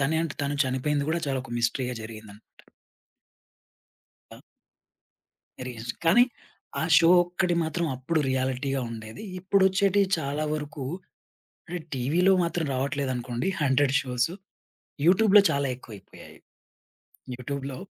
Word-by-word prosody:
తనేంటి 160 Hz, +2 st, 0 dB
తను 145 Hz, 0 st, -1 dB
చనిపోయింది 140 Hz, +3 st, -1 dB
గూడా 170 Hz, +1 st, 0 dB
చాలా 135 Hz, -2 st, -1 dB
ఒక 120 Hz, -, -9 dB
మిస్టరీ‌గా 125 Hz, +2 st, -1 dB
జరిగిందంట. 110 Hz, -1 st, -11 dB, 1.9 s
ఆ! -, -, -12 dB, 1.3 s
రియజ్, 120 Hz, -1 st, -5 dB
కానీ 200 Hz, +9 st, +7 dB, 0.6 s
ఆ -, -, 0 dB
షో 165 Hz, 0 st, +6 dB
ఒక్కటి 175 Hz, 0 st, -1 dB
మాత్రం 160 Hz, +2 st, -1 dB
అప్పుడు 145 Hz, +6 st, -1 dB
రియాలిటీగా 130 Hz, +1 st, -1 dB
ఉండేది. 110 Hz, -, -8 dB, 0.2 s
ఇప్పుడొచ్చేటియి 195 Hz, +1 st, +3 dB
చాలా 145 Hz, +1 st, -2 dB
వరుకూ 150 Hz, -2 st, -5 dB, 0.8 s
అంటే, 175 Hz, +1 st, -4 dB, 0.2 s
టీవీలో 160 Hz, +10 st, +2 dB
మాత్రం 170 Hz, -1 st, -1 dB
రావట్లేదనుకోండి, 130 Hz, +1 st, -2 dB
హన్‌టెడ్ 135 Hz, -1 st, +3 dB
షోసు. 125 Hz, +5 st, -1 dB, 0.7 s
యూట్యూబ్‌లో 200 Hz, +3 st, +6 dB
చాలా 140 Hz, 0 st, 0 dB
ఎక్కువైపోయాయి. 110 Hz, -5 st, -13 dB, 1.0 s
యూట్యూబ్‌లో 135 Hz, +1 st, -5 dB
140 Hz, 105 wpm, -26 LUFS, 130-170 Hz, 1.9 s, కానీ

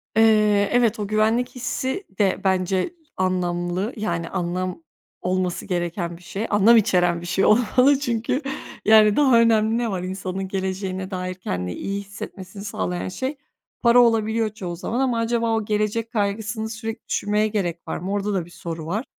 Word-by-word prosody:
Eee, 210 Hz, -2 st, +4 dB
evet, 235 Hz, -3 st, +3 dB
o 205 Hz, -, -2 dB
güvenlik 220 Hz, +4 st, +1 dB
hissi 260 Hz, -, -2 dB, 0.2 s
de 195 Hz, -2 st, +2 dB
bence 190 Hz, -, +1 dB, 0.2 s
anlamlı, 180 Hz, +2 st, -1 dB
yani, 170 Hz, -6 st, -2 dB
anlam 180 Hz, -1 st, -3 dB, 0.4 s
olması 185 Hz, -1 st, -1 dB
gereken 175 Hz, -1 st, -2 dB
bir -, -, -19 dB
şey, 200 Hz, +5 st, -4 dB
anlam 215 Hz, +3 st, +6 dB
içeren 175 Hz, -5 st, +2 dB
bir -, -, -8 dB
şey 190 Hz, +2 st, +1 dB
olmalı. 250 Hz, +5 st, +4 dB
Çünkü, 240 Hz, 0 st, -1 dB, 0.4 s
yani, 215 Hz, -1 st, +6 dB
daha 265 Hz, -5 st, +5 dB
önemli 225 Hz, -1 st, +3 dB
ne 235 Hz, -2 st, -1 dB
var 185 Hz, -2 st, -3 dB
insanın 190 Hz, 0 st, -4 dB
geleceğine 190 Hz, 0 st, -3 dB
dair 185 Hz, 0 st, -3 dB
kendini 90 Hz, -, -4 dB
iyi 200 Hz, 0 st, -3 dB
hissetmesini 200 Hz, -1 st, -9 dB
sağlayan 90 Hz, -, -3 dB
şey? 265 Hz, -, -4 dB, 0.4 s
Para 240 Hz, 0 st, +6 dB
olabiliyor 225 Hz, -1 st, +3 dB
çoğu 180 Hz, -5 st, -5 dB
zaman 225 Hz, +8 st, -3 dB
ama 250 Hz, -3 st, +1 dB
acaba 230 Hz, 0 st, 0 dB
o 220 Hz, -, -1 dB
gelecek 215 Hz, +2 st, -1 dB
kaygısını 220 Hz, +1 st, -2 dB
sürekli 225 Hz, 0 st, -6 dB
düşünmeye 210 Hz, +1 st, +1 dB
gerek 175 Hz, -6 st, -3 dB
var -, -, -3 dB
mı? 190 Hz, +3 st, -5 dB
Orada 205 Hz, 0 st, -1 dB
da 180 Hz, -4 st, -1 dB
bir -, -, -15 dB
soru 165 Hz, -2 st, -6 dB
var. 210 Hz, +10 st, -2 dB
205 Hz, 165 wpm, -23 LUFS, 185-225 Hz, 0.4 s, anlam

